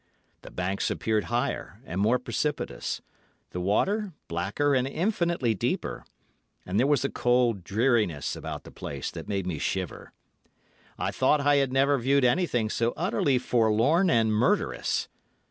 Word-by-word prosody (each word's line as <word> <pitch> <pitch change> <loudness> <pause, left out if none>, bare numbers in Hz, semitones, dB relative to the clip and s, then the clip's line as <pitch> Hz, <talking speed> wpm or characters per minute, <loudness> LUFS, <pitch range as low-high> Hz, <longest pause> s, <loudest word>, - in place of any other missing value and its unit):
The - - -11
banks 90 +2 -2
appeared 110 -2 0
higher 120 +1 -2
and 90 +4 -3
more 115 +5 +4
precipitous, 125 - -3 0.5
the 90 - -4
water 195 - +1
blacker 100 - 0
and 130 -1 +2
infinitely 170 - 0
deeper, 100 - -2 0.6
and 95 +3 0
there 130 - +3
was 145 -1 +2
a - - +1
cold 120 -5 +2
dreariness 105 - +1
about - - -6
the - - -12
place - - -5
that - - -8
made 100 -3 -1
me 85 -5 -3
shiver. - - -3 0.9
I - - -1
thought 150 - +3
I 145 0 +4
had 135 -2 +1
never 135 +1 +3
viewed 135 +2 +3
anything 125 -5 +2
so 115 +1 0
utterly 130 +3 +1
forlorn 125 - +3
and 110 -2 +3
murderous. 110 +4 +1
120 Hz, 145 wpm, -27 LUFS, 105-140 Hz, 0.9 s, more